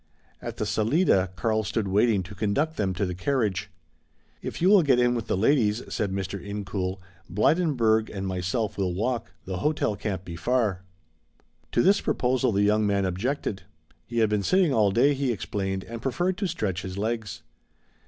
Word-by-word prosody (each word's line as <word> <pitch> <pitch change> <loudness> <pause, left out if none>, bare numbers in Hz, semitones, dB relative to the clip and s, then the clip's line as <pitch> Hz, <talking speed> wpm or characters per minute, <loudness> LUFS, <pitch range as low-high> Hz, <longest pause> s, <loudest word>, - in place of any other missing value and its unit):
At - - -6
the - - -1
salida 110 - +2
Karl 110 +4 0
stood 105 +1 -2
waiting 100 0 +2
to 95 +3 -10
conduct 105 - 0
them 95 -3 -1
to 100 - 0
the 90 - -3
carriage. 105 -1 -1 0.7
"If - - -5
you 175 - +3
will 205 -2 +7
get 140 -6 +3
in 120 0 +3
with 115 -3 -3
the - - 0
ladies," 110 -1 +2
said 105 -3 -1
Mr. 95 0 -4
Incoul, 95 -2 -3 0.3
"Blydenburg 110 - +2
and 95 -1 -5
myself 95 +4 -2
will 90 -2 0
walk. 120 +5 -2
The 95 -1 -4
hotel 110 -1 0
can't 95 -3 -4
be 85 - -7
far." 105 0 0 0.9
To 120 - +3
this 200 +2 +4
proposal 125 0 +1
the 100 0 +2
young 105 +1 +3
man 100 -1 +1
objected. 100 +3 -2 0.5
He 120 - -5
had 110 -2 +4
been 105 -1 +2
sitting 180 - +3
all 105 -4 +4
day, 120 +8 +4
he 135 -2 0
explained, 95 0 -3
and 115 +2 -8
preferred 175 +9 0
to 200 - 0
stretch 105 - -2
his 95 0 -6
legs. 110 -1 -3
105 Hz, 180 wpm, -26 LUFS, 95-125 Hz, 0.9 s, will